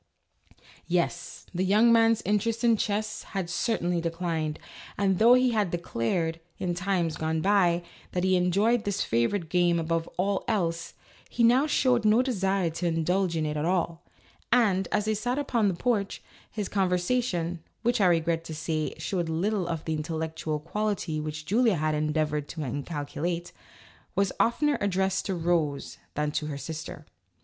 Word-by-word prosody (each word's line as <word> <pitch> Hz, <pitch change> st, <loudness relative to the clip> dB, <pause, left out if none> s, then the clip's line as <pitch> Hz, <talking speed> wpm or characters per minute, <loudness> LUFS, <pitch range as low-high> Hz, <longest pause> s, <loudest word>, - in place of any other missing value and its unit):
Yes, 175 Hz, 0 st, -2 dB
the 180 Hz, +1 st, 0 dB
young 215 Hz, +5 st, +5 dB
man's 225 Hz, -1 st, +4 dB
interest 220 Hz, +3 st, 0 dB
in 235 Hz, -1 st, +5 dB
chess 215 Hz, +1 st, -2 dB, 0.2 s
had 175 Hz, -3 st, -2 dB
cer 225 Hz, +6 st, 0 dB
tainly 175 Hz, -1 st, -1 dB
declined, 165 Hz, -2 st, -2 dB, 0.4 s
and 195 Hz, -2 st, +1 dB
though 235 Hz, +3 st, +7 dB
he 255 Hz, 0 st, +3 dB
had 210 Hz, -5 st, +1 dB
declared, 165 Hz, 0 st, -1 dB, 0.2 s
in 180 Hz, -2 st, -1 dB
times 175 Hz, -3 st, -1 dB
gone 160 Hz, 0 st, -1 dB
by, 175 Hz, -2 st, +3 dB, 0.3 s
that 180 Hz, -, 0 dB
he 185 Hz, 0 st, +3 dB
enjoyed 200 Hz, +6 st, +2 dB
this 200 Hz, -1 st, -1 dB
favorite 120 Hz, -, 0 dB
game 175 Hz, 0 st, +2 dB
above 165 Hz, 0 st, -1 dB
all 195 Hz, +2 st, 0 dB
else, 170 Hz, -6 st, -1 dB, 0.3 s
he 235 Hz, -, 0 dB
now 250 Hz, +6 st, +5 dB
showed 255 Hz, -5 st, +2 dB
no 215 Hz, +4 st, +4 dB
desire 195 Hz, -7 st, 0 dB
to 175 Hz, +2 st, -2 dB
indulge 170 Hz, +2 st, +1 dB
in 155 Hz, -, 0 dB
it 150 Hz, 0 st, -2 dB
at 150 Hz, -, -1 dB
all, 170 Hz, -1 st, 0 dB, 0.5 s
and, 205 Hz, -6 st, +3 dB
as 210 Hz, -, +1 dB
they 215 Hz, -, +1 dB
sat 245 Hz, +5 st, -1 dB
upon 240 Hz, -7 st, +1 dB
the 190 Hz, -, 0 dB
porch, 205 Hz, 0 st, -1 dB, 0.3 s
his 210 Hz, -3 st, -4 dB
conver 185 Hz, -3 st, +1 dB
sation 180 Hz, -4 st, -1 dB, 0.2 s
(which, 240 Hz, -1 st, +2 dB
I 190 Hz, -, +5 dB
regret 165 Hz, -1 st, +1 dB
to 160 Hz, -, -6 dB
say, 155 Hz, 0 st, -2 dB
showed 175 Hz, -4 st, -2 dB
little 185 Hz, +3 st, 0 dB
of 165 Hz, -2 st, -4 dB
the 160 Hz, -, -1 dB
intellectual 160 Hz, 0 st, -3 dB
quality 185 Hz, -1 st, -2 dB
which 150 Hz, 0 st, -5 dB
Julia 225 Hz, +4 st, +3 dB
had 155 Hz, 0 st, 0 dB
endeavored 150 Hz, -1 st, 0 dB
to 160 Hz, -, -5 dB
inculcate) 145 Hz, +5 st, -3 dB, 0.6 s
was 195 Hz, -1 st, +2 dB
oftener 290 Hz, +5 st, +2 dB
addressed 190 Hz, -1 st, 0 dB
to 190 Hz, -, -1 dB
Rose 165 Hz, -4 st, -1 dB, 0.2 s
than 150 Hz, 0 st, 0 dB
to 150 Hz, 0 st, -2 dB
her 145 Hz, -2 st, -4 dB
sister. 160 Hz, 0 st, -7 dB
180 Hz, 165 wpm, -27 LUFS, 160-210 Hz, 0.6 s, though